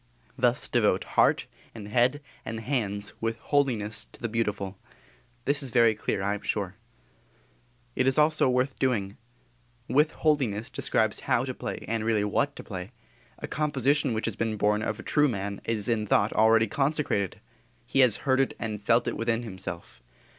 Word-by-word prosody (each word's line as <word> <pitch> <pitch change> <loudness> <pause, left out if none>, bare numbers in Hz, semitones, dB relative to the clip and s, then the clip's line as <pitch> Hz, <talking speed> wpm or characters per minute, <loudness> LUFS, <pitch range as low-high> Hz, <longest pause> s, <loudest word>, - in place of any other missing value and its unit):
_ - - -37 0.3
Thus - - +1
devote - - +2
heart - - +2 0.3
and 105 -2 -8
head 125 +6 +2 0.2
and 110 0 -5
hands 105 -5 -2
with 115 0 -1
holiness 115 -6 0
to - - -17
the 120 - -2
beautiful. 105 -4 -2 0.7
This 140 +1 +3
is 135 - -3
very 115 -2 +4
clear, 105 -2 -2
I 100 +1 +1
am 105 - -5
sure. 100 -4 -2 1.2
It 130 - +1
is 135 - +2
also 155 -2 +4
worth 125 +2 0
doing. 110 -7 0 0.7
"With 150 +3 +3
holiness" 130 -9 0
describes - - 0
how - - +1
to - - -3
play - - -6
and 115 0 -1
really 110 -2 +1
what 140 +7 0
to - - -9
play. 95 +2 -7 0.4
A - - -6
composition 140 -3 +1
which 110 - -2
has 115 - -2
been 110 -1 -2
born 105 +1 +2
of 110 +1 -3
a - - -7
true 150 -1 +3
man 100 -4 -3
is 110 -3 -1
in 110 -3 0
thought 100 +1 +2
already 110 +1 +5
consecrated. 135 - -1 0.5
He 135 - -1
has 125 -5 +5
heard 130 -1 +3
it 135 - +1
and 110 -2 -4
felt 115 +3 +2
it - - -1
within 115 0 -1
himself. 95 - -7
115 Hz, 175 wpm, -27 LUFS, 105-130 Hz, 1.2 s, already